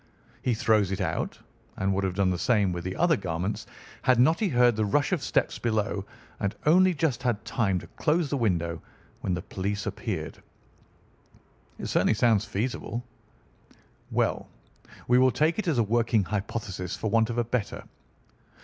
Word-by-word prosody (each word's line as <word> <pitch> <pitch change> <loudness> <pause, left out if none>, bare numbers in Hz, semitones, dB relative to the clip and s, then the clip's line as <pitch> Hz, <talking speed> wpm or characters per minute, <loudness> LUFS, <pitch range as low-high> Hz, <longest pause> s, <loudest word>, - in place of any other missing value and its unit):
He 125 - +1
throws 110 -5 +2
it 95 - -2
out, 85 -5 -2 0.4
and 95 +1 +1
would 95 +1 0
have 95 -1 -1
done 95 -1 +2
the 90 - -2
same 105 -6 +2
with 85 0 -4
the 95 +1 -4
other 170 -1 +3
garments 90 - -3 0.3
had 130 -2 +3
not 160 +7 +4
he 210 - +1
heard 125 -4 +4
the 110 - +1
rush 145 - +1
of 180 -6 +1
steps - - 0
below, 105 -3 -1 0.3
and 100 - -1
only 180 +3 +5
just 140 -5 0
had 115 -3 -1
time 100 -7 0
to - - -6
close 160 +1 0
the 140 - +1
window 85 -8 0 0.4
when 90 - -1
the 90 - -5
police 100 +2 -3
appeared." - - -4 1.4
"It - - -6
certainly 110 - +2
sounds 110 -2 +3
feasible." 120 +2 -3 1.1
"Well, - - 0 0.6
we 125 +1 +5
will 130 0 +6
take 155 - +1
it 215 - -2
as 155 -6 +1
a 115 - +4
working 115 0 +2
hypothesis 100 -2 -4
for 110 - -3
want 115 0 +3
of 120 - -3
a 120 - +3
better. 115 -2 -3
110 Hz, 175 wpm, -27 LUFS, 95-125 Hz, 1.4 s, will